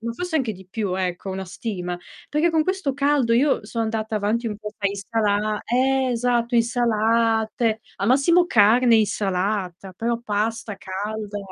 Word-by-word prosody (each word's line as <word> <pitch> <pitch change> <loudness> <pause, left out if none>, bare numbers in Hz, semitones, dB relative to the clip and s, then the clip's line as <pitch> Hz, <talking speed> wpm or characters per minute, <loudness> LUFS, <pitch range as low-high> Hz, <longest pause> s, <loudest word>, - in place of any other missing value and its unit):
ma 230 +1 -4
forse 360 +4 -3
anche 250 -7 0
di 190 -1 -13
più, 200 -2 -2
ecco, 185 0 -3
una 190 0 -4
stima, 180 -4 -5 0.3
perché 310 +3 +2
con 320 -1 +2
questo 375 -5 -1
caldo 280 -3 +2
io 260 -1 +2
sono 225 +1 -2
andata 220 0 -2
avanti 220 +3 0
un 210 -2 -3
po' 210 -1 -6
tra 200 -1 +1
insala 210 +1 -1
ehm, 260 +2 +2
esatto, 240 0 0
insalate, 225 -1 +1 0.2
al 200 +3 -1
massimo 335 +7 +4
carne 235 0 +5
e - - +5
insalata, 195 -2 -1
però 230 +5 -2
pasta 215 -1 -2
calda 205 +2 -5
225 Hz, 160 wpm, -23 LUFS, 205-245 Hz, 0.3 s, carne